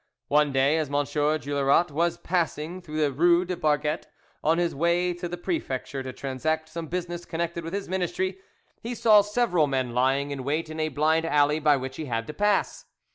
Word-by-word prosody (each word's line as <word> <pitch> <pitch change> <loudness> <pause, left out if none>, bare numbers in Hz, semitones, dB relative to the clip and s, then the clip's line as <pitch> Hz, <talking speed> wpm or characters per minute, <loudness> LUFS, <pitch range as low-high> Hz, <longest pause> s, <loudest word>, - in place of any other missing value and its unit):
One 150 0 +3
day, 135 +4 +3
as 155 - -1
M. 145 - -4
Juillerat 145 +1 +1
was 170 +4 0
passing 175 0 -2
through 155 -3 -4
the 145 -2 +2
rue 170 +5 +3
des 180 0 -3
Barquettes 150 -1 0 0.4
on 160 +2 +3
his 175 -1 0
way 170 +4 +1
to 175 0 -6
the 175 - -5
prefecture 140 - -3
to 130 0 -5
transact 155 +5 -2
some 165 -1 -6
business 175 0 -4
connected 170 0 -3
with 165 +2 -6
his 200 0 -3
ministry, 185 +1 -2 0.4
he 240 +2 -4
saw 215 -3 +6
several 205 -7 +1
men 130 -3 -1
lying 135 +3 +1
in 135 -2 -4
wait 155 +4 -2
in 155 - -6
a 155 0 0
blind 155 +3 +1
alley 150 0 +3
by 150 -2 +4
which 130 0 -6
he 155 - -4
had 115 -3 -2
to 150 - -7
pass. 205 +1 0
155 Hz, 195 wpm, -26 LUFS, 145-175 Hz, 0.4 s, saw